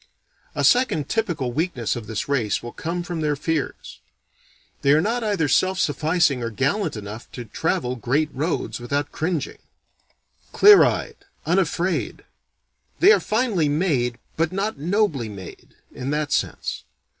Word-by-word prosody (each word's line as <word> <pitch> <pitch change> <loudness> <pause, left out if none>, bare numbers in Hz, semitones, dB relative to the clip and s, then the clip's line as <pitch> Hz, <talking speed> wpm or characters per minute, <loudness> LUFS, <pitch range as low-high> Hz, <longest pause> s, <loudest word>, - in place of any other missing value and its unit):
A - - -1
second 245 - +3
typical 175 - -1
weakness 145 - -1
of 115 -3 -7
this 110 -2 -3
race 125 -8 0
will 120 - -6
come 170 +5 -4
from 175 -2 -4
their 150 -1 +1
fears. 155 +1 -3 0.8
They 140 - +4
are 150 - +5
not 230 +7 0
either 200 -8 +1
self 185 +7 +2
sufficing 155 -2 +1
or 115 - -2
gallant 140 - -1
enough 105 +2 -8
to 120 - -7
travel 125 +3 -1
great 140 +7 0
roads 150 +1 -2
without 140 +4 -2
cringing, 160 -3 -3 0.9
clear 415 0 +8
eyed, - - -1 0.3
unafraid. - - 0 0.8
They 390 - +7
are - - +5
finely 215 - +1
made, 145 -7 0 0.2
but 165 +1 +1
not 195 -3 -2
nobly 165 - 0
made, 95 -4 -11 0.2
in 125 - -5
that 150 0 -1
sense. - - -2
150 Hz, 145 wpm, -23 LUFS, 125-180 Hz, 0.9 s, clear